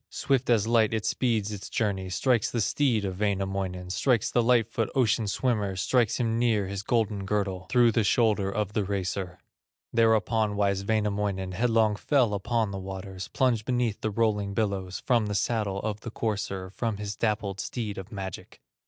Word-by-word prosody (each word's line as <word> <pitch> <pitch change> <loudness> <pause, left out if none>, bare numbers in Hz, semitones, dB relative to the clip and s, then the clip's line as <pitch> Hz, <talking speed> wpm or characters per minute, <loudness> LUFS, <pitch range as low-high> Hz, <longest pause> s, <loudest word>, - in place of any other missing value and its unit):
Swift 135 -2 0
as 110 -4 +4
light 115 -1 +3
it 110 - -2
speeds 110 -5 0
its 100 -2 -7
journey, 95 -4 -1
Strikes 115 +5 +1
the 120 - -2
steed 115 -2 +1
of 95 -1 -4
Wainamoinen, 95 -3 -2
Strikes 120 +1 +1
the 120 - +3
light 115 -2 +3
foot, 115 -1 -2
ocean 115 -4 +2
swimmer, 105 -4 0
Strikes 110 +6 +1
him 115 -1 0
near 115 -4 +2
his 100 0 -4
golden 105 -2 0
girdle, 95 -2 -2
Through 120 -2 +5
the 115 0 +2
shoulder 105 -2 +2
of 105 0 -2
the 105 - +1
racer. 95 -2 -3 0.6
Thereupon 110 -2 +2
wise 100 -1 +1
Wainamoinen 100 -3 -1
Headlong 110 +1 +2
fell 125 -1 +2
upon 110 +1 0
the 100 - -4
waters, 95 -1 -6
Plunged 125 -5 +1
beneath 120 -4 0
the 110 - 0
rolling 105 -2 0
billows, 95 -3 -2
From 120 -4 +2
the 105 - -2
saddle 105 -3 0
of 105 -1 -3
the 115 - -7
courser, 100 -4 -3
From 110 0 -2
his 105 0 -4
dappled 105 -3 -1
steed 105 -4 -4
of 95 +4 -9
magic. 95 -3 -7
105 Hz, 175 wpm, -27 LUFS, 100-115 Hz, 0.6 s, Through